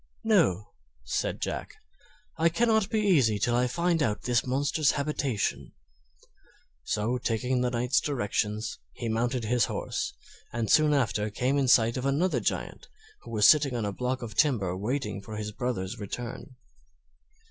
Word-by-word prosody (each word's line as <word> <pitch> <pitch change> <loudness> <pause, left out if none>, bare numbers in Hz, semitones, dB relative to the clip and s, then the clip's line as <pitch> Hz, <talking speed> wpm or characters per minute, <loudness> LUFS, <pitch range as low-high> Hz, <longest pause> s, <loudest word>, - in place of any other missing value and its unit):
"No," 165 - +2 0.3
Said - - -2
Jack, - - -4 0.6
"I 165 +2 +3
cannot 220 +2 +2
be 220 - 0
easy 140 - +3
till 120 +4 +1
I 125 +1 +2
find 170 +5 0
out 105 -7 0
this 120 -1 +1
monster's 140 +3 +1
habitation." 140 -6 -2 1.1
So 115 +4 -1
taking 125 +2 0
the 125 - +1
Knight's 125 +2 +1
directions, 110 -5 -2
he 120 - -5
mounted 120 +2 -1
his 120 -1 +2
horse - - -3 0.4
and 115 -2 -2
soon 155 -1 +5
after 110 -5 0
came 125 +6 0
in 135 - +1
sight 115 -1 +4
of 130 +1 -1
another 160 +7 +1
Giant, - - -3 0.3
who - - -12
was 105 -3 +4
sitting 145 -4 +5
on 115 -3 -1
a 100 - -1
block 125 +3 -2
of 110 -2 -6
timber 105 - +1
waiting 105 0 -3
for 110 +2 -8
his 105 0 -4
brother's 100 -5 -3
return. 120 +5 -7
125 Hz, 155 wpm, -28 LUFS, 110-140 Hz, 1.1 s, soon